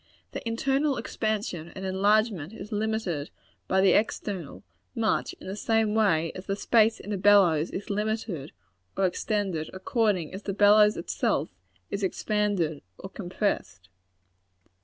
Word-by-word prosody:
Their - - -5
internal 270 +5 +1
expansion 205 -7 -3
and 190 - -6
enlargement 200 -2 +1
is 205 -2 -9
limited 210 -8 -2 0.4
by 190 - +3
the 190 -1 +5
external, 200 -6 -1 0.3
much 225 -2 0
in - - -14
the 190 - -5
same 220 0 +1
way 165 -7 +2
as 185 - -9
the 195 - 0
space 225 +1 +3
in 205 - -5
a 195 - -2
bellows 185 -6 +5
is 200 +2 -5
limited 210 -7 -2 0.5
or 195 - +3
extended 185 -3 -1
according 190 -3 0
as 190 - -6
the 200 - -3
bellows 210 +1 +6
itself 170 - -1 0.4
is 200 - -2
expanded 195 -5 0 0.2
or 190 - -9
compressed. 175 - -3
200 Hz, 140 wpm, -27 LUFS, 180-215 Hz, 0.5 s, bellows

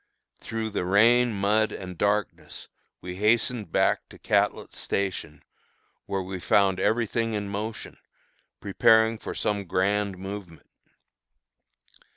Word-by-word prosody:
Through 110 -1 -4
the 100 - -2
rain, 115 +6 +4
mud, 105 +2 +1
and 90 -1 -7
darkness 105 +3 -2 0.3
we 90 0 -7
hastened 110 -1 +1
back - - +1
to - - -14
Catlett's - - 0
Station, 90 -7 -3 0.6
where 95 -1 -2
we 95 0 -6
found 95 +1 +2
every 115 +4 +2
thing 115 +1 -2
in 105 -1 -3
motion, 110 +2 -6 0.6
preparing 110 0 +3
for - - -6
some 100 -1 -1
grand 100 +2 0
movement. 95 -5 -8
100 Hz, 120 wpm, -26 LUFS, 95-110 Hz, 0.6 s, rain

